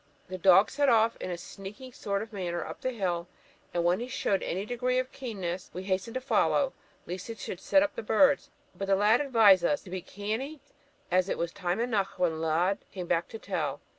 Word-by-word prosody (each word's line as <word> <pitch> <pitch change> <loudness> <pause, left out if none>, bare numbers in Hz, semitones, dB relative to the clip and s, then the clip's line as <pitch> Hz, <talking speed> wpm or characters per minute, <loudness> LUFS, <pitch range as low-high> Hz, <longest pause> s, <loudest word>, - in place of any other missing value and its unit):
The 185 0 -5
dog 190 +3 +6
set 285 -1 +2
off 225 -1 +4
in - - -5
a 175 - -3
sneaking 200 +8 -10
sort 200 -1 -2
of 225 - -12
manner 175 -3 -3
up - - -8
the 255 - 0
hill, 180 -7 -2 0.4
and, 175 - 0
when 175 +3 +3
he 240 - -4
showed 205 -6 0
any 190 +3 -2
degree 250 +2 0
of 255 0 -1
keenness, 190 -8 -5
we 185 - -4
hastened 190 +4 -2
to - - 0
follow, - - +2 0.3
lest 180 +1 -6
he 230 - -5
should 185 - -6
set 290 +8 +4
up 300 - -2
the - - -5
birds; 275 +6 +3 0.3
but 195 - -4
the 195 - +4
lad 210 +5 +4
advised 220 -10 +6
us 290 +11 +1
'to 185 - -12
be 185 -1 -3
canny, 220 - -4 0.5
as 185 +1 +3
it - - -1
was 170 0 -2
time 180 +1 -2
eneuch 220 -5 0
when 165 -3 0
Lud 170 +5 +1
came 185 -2 -5
back 170 0 0
to 225 - -8
tell.' - - -3
200 Hz, 220 wpm, -29 LUFS, 180-235 Hz, 0.5 s, dog